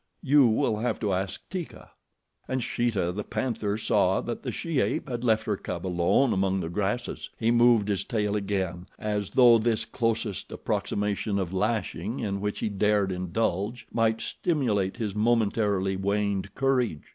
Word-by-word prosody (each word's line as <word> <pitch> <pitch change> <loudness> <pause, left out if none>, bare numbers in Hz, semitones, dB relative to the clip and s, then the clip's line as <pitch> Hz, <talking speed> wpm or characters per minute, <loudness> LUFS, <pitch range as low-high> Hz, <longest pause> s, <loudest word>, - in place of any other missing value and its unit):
You 145 -3 +6
will 110 -1 +1
have 115 +1 -1
to 105 -3 0
ask 95 +1 -3
Teeka. 185 -4 -6 0.6
And 130 -1 -1
Sheeta, 110 -9 0
the 105 +3 -4
panther, 105 -5 -2
saw 100 -3 +2
that 120 -1 -5
the - - -3
she 165 -5 -2
ape - - 0
had 120 -2 -4
left 110 -2 +3
her 105 - 0
cub 85 -2 -5
alone 90 +8 +2
among 95 0 +1
the 80 -3 -3
grasses. 105 +6 -2
He 115 0 +2
moved 120 -3 +5
his 100 -2 0
tail 105 -4 -1
again, 95 -3 -2
as 105 -2 -2
though 120 -3 +6
this 110 0 0
closest 115 -4 -2
approximation 105 0 -1
of 95 -2 -2
lashing 110 +4 -1
in 100 -4 -2
which 105 0 -3
he - - 0
dared 100 -1 +1
indulge 95 +5 -2
might 115 -1 +1
stimulate 110 - 0
his 110 -4 -2
momentarily 105 -3 +1
waned 100 0 -1
courage. 125 - +1
105 Hz, 160 wpm, -27 LUFS, 95-120 Hz, 0.6 s, You